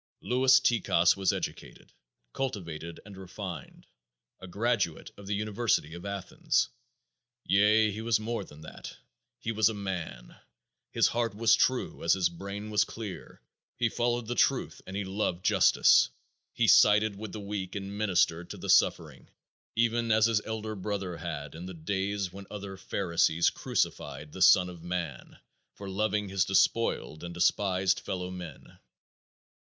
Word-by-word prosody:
Louis 130 +1 +4
Tikas 95 -8 +3
was 95 -1 +1
educated, - - -6 0.4
cultured 85 -10 -5
and 105 -2 -11
refined, 95 -4 -8 0.5
a 95 - -10
graduate 100 -3 -1
of 100 - -12
the 105 - -1
University 105 -6 0
of 85 +3 -8
Athens; 100 -2 -1 0.7
yea, 105 +2 +4
he 105 +2 -6
was 115 -1 +1
more 115 -1 -3
than 75 -4 -14
that, 80 - -10 0.4
he 115 - -4
was 110 -1 +3
a 110 - -4
MAN! 85 -12 -6 0.5
His - - +2
heart 115 -2 -1
was 110 0 +4
true 130 +2 +1
as 85 - +4
his 90 -3 +2
brain 100 +4 -7
was 105 -1 +4
clear; 110 -4 -9 0.3
he 120 -2 +1
followed 120 +1 -1
the 120 - -3
truth 135 +2 +1
and 95 - -7
he 100 - -1
loved 95 -2 -2
justice; - - +5 0.4
he - - +1
sided 105 0 +5
with 110 +1 -7
the 110 - -6
weak 100 -2 -5
and 100 0 -5
ministered 90 -4 +1
to - - -7
the - - -1
suffering, - - +2 0.5
even 115 0 +1
as 110 0 +5
his 115 -2 +2
elder 110 -1 -4
brother 100 -3 -4
had 75 -4 -6
in 85 +3 -8
the 95 - -8
days 95 +2 -2
when 100 0 -10
other 100 -2 -7
pharisees 85 -3 +1
crucified 75 +1 -3
the 95 - -9
Son 90 0 +7
of 90 -2 -10
Man 85 -6 -5 0.4
for 100 - -9
loving 105 +1 -1
his 95 -1 +1
despoiled 95 - +1
and 85 0 -7
despised 95 +1 +2
fellow 90 -1 -4
men. 90 -5 -10
100 Hz, 155 wpm, -29 LUFS, 90-110 Hz, 0.7 s, Son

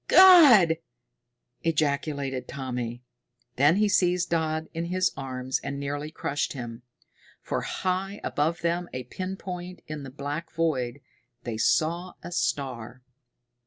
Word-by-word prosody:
"God!" 280 - +8 0.8
ejaculated 140 -4 -1
Tommy. 125 -2 -4 0.5
Then 145 +5 +5
he 210 +1 +3
seized 180 -3 +2
Dodd 160 -1 0
in 165 +1 -3
his 185 +2 +1
arms 130 -1 -3
and 140 +1 -5
nearly 145 +2 -3
crushed 145 -2 -2
him. 120 -3 -7 0.6
For - - -2
high 190 +2 -2
above 160 +3 0
them, 170 +1 -1
a 130 - -4
pin 185 +9 -5
point 180 -1 -7
in 155 -1 -6
the 135 - -7
black 145 +4 -5
void, 140 -5 -1 0.4
they 115 -2 -4
saw 170 +9 +1
a - - -7
star! 130 -6 -2
155 Hz, 125 wpm, -27 LUFS, 135-175 Hz, 0.8 s, God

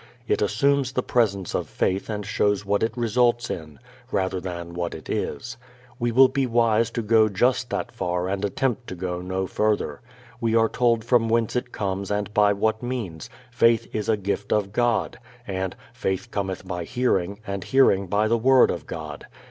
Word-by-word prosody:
It - - +1
assumes 130 +6 +2
the 125 - 0
presence 100 -7 0
of - - -2
faith 95 +3 -1
and 105 -2 -3
shows 105 -1 +1
what 100 +1 +1
it 110 +1 -1
results 120 +1 +2
in, 75 -3 -7 0.3
rather 95 -3 0
than 85 -2 -6
what 85 0 -3
it - - -11
is. 115 +13 -3 0.4
We 120 0 0
will 130 +3 +7
be 135 0 0
wise 115 -1 +2
to 115 0 -3
go 110 0 +4
just 125 +5 +1
that - - -3
far 90 +1 -2
and 95 +1 -2
attempt 120 +4 -1
to 95 - -6
go 90 0 -4
no 95 +1 -2
further. 105 +2 -1 0.4
We 115 -2 +1
are 115 -1 +4
told 115 -2 +2
from 115 -2 +3
whence 115 0 +1
it 125 0 -2
comes 100 -1 -3
and 105 0 -2
by 105 -1 +4
what 110 +2 0
means: 115 -11 -5 0.2
"Faith 115 -2 +3
is 105 0 -2
a 110 - +3
gift 100 0 -3
of 100 -2 +1
God," 120 -1 0 0.3
and 95 -1 -3 0.2
"Faith 95 +5 -3
cometh 95 -2 -3
by 90 -1 -3
hearing, 100 -3 0
and 100 -2 -4
hearing 100 -8 +3
by 105 +4 +2
the 115 +1 +2
word 130 +2 +5
of 85 -4 -6
God." 75 -3 -7
105 Hz, 190 wpm, -24 LUFS, 95-120 Hz, 0.4 s, will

